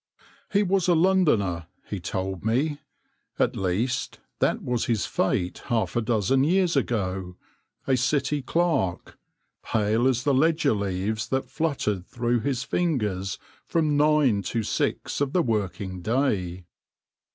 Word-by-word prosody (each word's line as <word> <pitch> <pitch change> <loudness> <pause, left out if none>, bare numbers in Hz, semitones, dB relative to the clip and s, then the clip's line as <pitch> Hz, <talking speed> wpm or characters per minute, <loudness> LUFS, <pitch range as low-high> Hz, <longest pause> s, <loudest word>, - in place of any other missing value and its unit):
He 205 0 +3
was 190 -2 +1
a 175 - +5
Londoner 150 - +2
— - - -41
he 100 - -2
told 95 +1 -4
me 140 +7 0 0.3
— - - -47
at - - +1
least, 100 +8 -1 0.2
that - - +1
was 125 -2 -1
his 115 -3 0
fate 90 0 -1
half 110 -7 0
a 120 - +2
dozen 115 +3 +2
years 180 +2 +2
ago 95 -8 -1 0.3
— - - -47
a 130 - +4
City 140 +3 +1
clerk, 155 - -1 0.4
pale 110 +3 +1
as 125 -2 +1
the 145 - +2
ledger 155 +1 +3
leaves 100 +2 -2
that 130 0 -2
fluttered 135 - -1
through 120 0 0
his 125 +2 -1
fingers 105 - -1 0.3
from 155 -3 +1
nine 145 -7 +3
to 110 +4 -2
six 105 - -1
of 140 -1 0
the 180 - +3
working 95 -5 -2
day. 95 -6 -1
120 Hz, 145 wpm, -25 LUFS, 100-145 Hz, 0.4 s, a